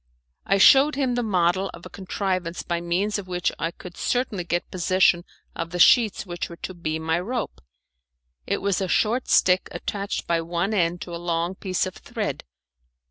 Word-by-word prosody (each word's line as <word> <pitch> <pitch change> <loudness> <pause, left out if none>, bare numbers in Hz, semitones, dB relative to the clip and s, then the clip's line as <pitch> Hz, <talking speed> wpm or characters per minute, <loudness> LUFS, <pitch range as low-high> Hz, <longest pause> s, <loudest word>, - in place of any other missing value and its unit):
I 195 - +3
shewed 275 +9 +7
him 265 -3 0
the 245 - 0
model 190 -3 +1
of - - -13
a - - -8
contrivance 185 -3 -3
by 170 -1 -2
means 190 +5 0
of 190 - -8
which 180 -1 -1
I 165 - 0
could 175 +1 -11
certainly 245 -7 -1
get 175 0 -2
possession 180 -1 +2 0.3
of 165 - -4
the 175 - -5
sheets 215 +4 +5
which 175 -2 -5
were 170 - -9
to 185 - -7
be 160 -3 -3
my 160 +1 0
rope; 230 +5 -4 0.9
it - - -1
was 200 -1 +1
a 190 - 0
short 230 +7 +1
stick 185 0 +3
attached 200 -1 -4
by 170 -1 +1
one 170 +5 -2
end 175 -3 +1
to 175 - -6
a 170 - -7
long 170 +1 -1
piece 185 -1 -1
of 185 - -5
thread. - - -4
180 Hz, 190 wpm, -24 LUFS, 170-200 Hz, 0.9 s, shewed